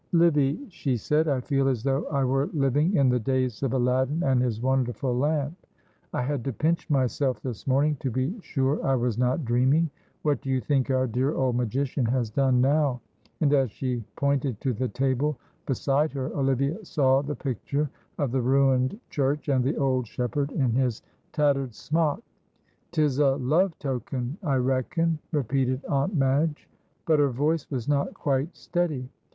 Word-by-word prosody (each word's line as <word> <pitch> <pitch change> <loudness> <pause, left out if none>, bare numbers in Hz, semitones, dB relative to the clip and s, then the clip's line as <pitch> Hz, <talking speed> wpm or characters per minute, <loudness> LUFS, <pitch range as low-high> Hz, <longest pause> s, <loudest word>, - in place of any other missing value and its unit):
"Livy," 150 -4 +3
she 135 -7 -1
said, 150 +7 +1
"I 135 -4 +1
feel 135 +1 +1
as 125 -4 0
though 135 +3 0
I 140 -2 0
were 135 +2 +1
living 145 +5 +2
in 140 -5 +4
the 125 0 +2
days 130 -1 -1
of 135 -2 0
Aladdin 130 +5 +1
and 130 -2 +3
his 120 -4 -1
wonderful 125 0 0
lamp. 145 +3 0 0.6
I - - -1
had 135 -1 -2
to 135 - -2
pinch 165 +9 0
myself 130 -1 +1
this 125 -2 -6
morning, 140 +3 +2
to 135 - -2
be 130 - -1
sure 135 -3 -1
I 135 - +2
was 120 -2 -1
not 125 +4 +1
dreaming. 130 +7 +2 0.3
What 145 -4 +1
do 135 - -6
you 130 -1 +2
think 130 +3 0
our 130 -1 +2
dear 130 +5 0
old 130 -2 +1
magician 125 +3 -1
has 120 -2 0
done 130 +1 +2
now?" 140 -1 +2 0.4
And 145 -2 +3
as 135 -3 +3
she 125 +2 -3
pointed 140 -5 0
to 130 -3 0
the 130 +3 -1
table 135 +3 0 0.3
beside 140 +3 +1
her, 135 -2 -4
Olivia 140 - 0
saw 135 -6 +2
the 145 +1 -4
picture 140 +3 -2 0.3
of 140 -5 -1
the 130 0 +1
ruined 130 - +2
church, 145 +1 0
and 130 -3 +3
the 140 +5 0
old 130 -4 +1
shepherd 140 +5 -2
in 130 -5 +1
his 125 -2 0 0.3
tattered 140 -5 +1
smock. 160 - 0 0.7
"'Tis 150 -5 +1
a 135 -2 +4
love 155 +7 +1
token, 130 - -4
I 145 -8 0
reckon," 135 +6 0
repeated 130 -2 0
Aunt 140 +7 0
Madge, 145 +2 +1 0.4
but 155 -2 +3
her 145 -1 +4
voice 145 +5 0
was 125 -5 -3
not 145 -1 0
quite 140 +3 -1
steady. 160 -8 -2
135 Hz, 175 wpm, -26 LUFS, 130-145 Hz, 0.7 s, in